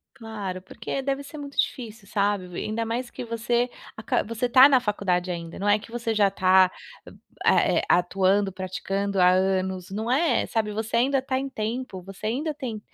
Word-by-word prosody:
Claro, 205 -5 -6
porque 190 +7 -5
deve 275 +1 -2
ser 300 +2 -10
muito 280 -1 -9
difícil, 225 -5 -2
sabe, 205 -2 0
ainda 225 +4 -2
mais 240 +2 -3
que - - -7
você 235 +1 0 0.3
aca 220 - 0
você 230 +2 -2
tá 260 +3 +8
na 265 -2 +5
faculdade 185 -5 -1
ainda, 170 -1 -6
não 200 - -3
é 205 +1 +4
que 215 - -13
você 230 -1 -2
já 205 -2 +4
tá, 185 -1 +4 0.7
é - - +4
é - - -3
atuando, 190 +3 +2
praticando 195 +1 -3
há 180 - +6
anos, 185 -1 0
não 220 +4 -3
é, 310 +6 +2
sabe, 220 -2 -1
você 220 +2 -3
ainda 270 +3 +3
tá 260 0 -2
em 275 0 -4
tempo, 225 -3 -4
você 195 +3 -7
ainda 290 +8 -1
tem 255 -7 -5
215 Hz, 185 wpm, -25 LUFS, 190-245 Hz, 0.7 s, tá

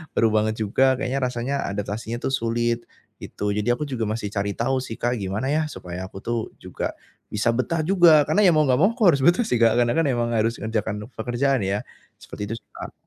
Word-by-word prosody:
baru 115 - +4
banget 110 0 +1
juga 130 +5 +2
kayaknya 135 0 -2
rasanya 125 +2 -2
adaptasinya 105 +3 -4
tuh - - -1
sulit, 120 -1 0 0.4
gitu. 105 0 -3
Jadi 105 +3 -1
aku 120 +5 -1
juga 125 -5 -3
masih 110 -1 -3
cari 100 0 -1
tahu 130 +3 0
sih, 115 -3 -6
Kak, 120 +1 0
gimana 100 +7 -2
ya 155 - +2
supaya 90 -3 -7
aku 95 - -12
tuh 120 0 -1 0.2
juga - - -4 0.4
bisa 110 +3 +1
betah 155 +6 0
juga, 170 -3 +6
karena 210 - +3
ya 180 - +7
mau 155 - +4
enggak 125 -1 +3
mau 200 +4 +5
aku 240 - -15
harus 140 -4 +2
betah 175 +7 +5
sih, 125 - +1
Kak, 115 -1 +5
karena 120 -1 +3
kan 165 - +3
emang 120 -3 0
harus 115 +2 +1
ngerjakan 110 -1 -3
pekerjaan 120 +1 0
ya, 100 +2 -1 0.4
seperti - - -10
itu - - -2
sih, - - -50
Kak. - - -7
120 Hz, 215 wpm, -23 LUFS, 110-135 Hz, 0.4 s, ya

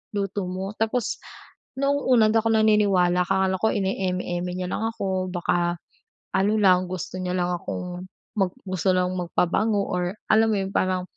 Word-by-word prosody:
luto 195 -1 -2
mo." 190 +2 -4
tapos 225 +1 -1 0.6
noong 280 +1 +2 0.2
una 240 -3 +6
hindi 215 - +1
ako 225 - 0
naniniwala 205 -5 +3
akala 190 0 +1
ko 220 +4 +1
ine-eme-eme 185 -2 -2
niya 180 0 -4
lang 220 - -2
ako. 190 -3 -2
Baka 175 -1 0 0.5
ano 195 +2 +2
lang, 185 -3 +4
gusto 185 0 -5
niya 180 0 -2
lang 180 -1 0
akong 180 +1 -6 0.3
mag 190 -2 +1
gusto 185 -1 0
lang 180 0 +1
magpabango 200 +4 +1
or 180 +1 -1 0.2
alam 220 +1 +5
mo 220 - +1
yun 190 - -5
parang 185 -1 0
185 Hz, 160 wpm, -24 LUFS, 180-205 Hz, 0.6 s, una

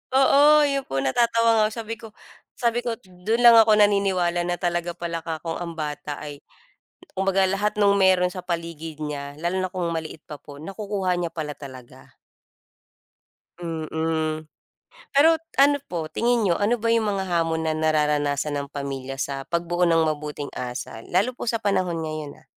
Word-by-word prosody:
Oo, 290 +3 +6
yun 275 -2 0
po, 135 0 -2
natatawa 230 - +2
nga - - +5
ako, - - -7
sabi 225 +1 -5
ko 225 - -10 0.5
sabi 235 -1 +1
ko, 235 -2 -3
dun 205 +3 -3
lang 235 -1 +10
ako 220 -1 +6
naniniwala 195 -4 +2
na 175 - 0
talaga 175 -1 -2
pala 170 -1 -4
'ka 160 -1 -5
kong 165 0 -3
ang 170 -1 -5
bata 150 -1 -4
ay, 145 -1 -8 0.8
kumbaga, 195 0 +2
lahat 205 +2 -1
nung 200 -1 +5
meron 185 -1 +4
sa 185 - -7
paligid 165 -2 -5
niya 145 -1 -5
lalo 175 +3 -1
na 185 - -3
kung 180 -3 -2
maliit 160 -1 -6
pa 150 - -7
po, 145 -1 -12
nakukuha 195 +1 -2
niya 170 -2 -2
pala 150 -3 -5
talaga. 130 -4 -13 1.4
Mm, 160 -1 -2 0.7
pero 320 +4 +6 0.2
ano 285 +1 +5
po, 165 -3 -4
tingin 240 0 +1
niyo, 180 -5 +2
ano 210 +3 +2
ba 230 - 0
yung 230 -2 +2
mga 195 - -1
hamon 165 -2 0
na - - +1
nararanasan 150 -2 +1
ng 140 0 -5
pamilya 135 -2 -5
sa 135 -1 -3
pagbuo 175 +1 0
ng 165 -1 +4
mabuting 150 -2 -3
asal? 125 -2 -6
Lalo 190 +8 +1
po - - -6
sa 230 -1 0
panahon 185 -4 0
ngayon 155 -2 -6
ah. - - -31
175 Hz, 175 wpm, -24 LUFS, 155-205 Hz, 1.4 s, lang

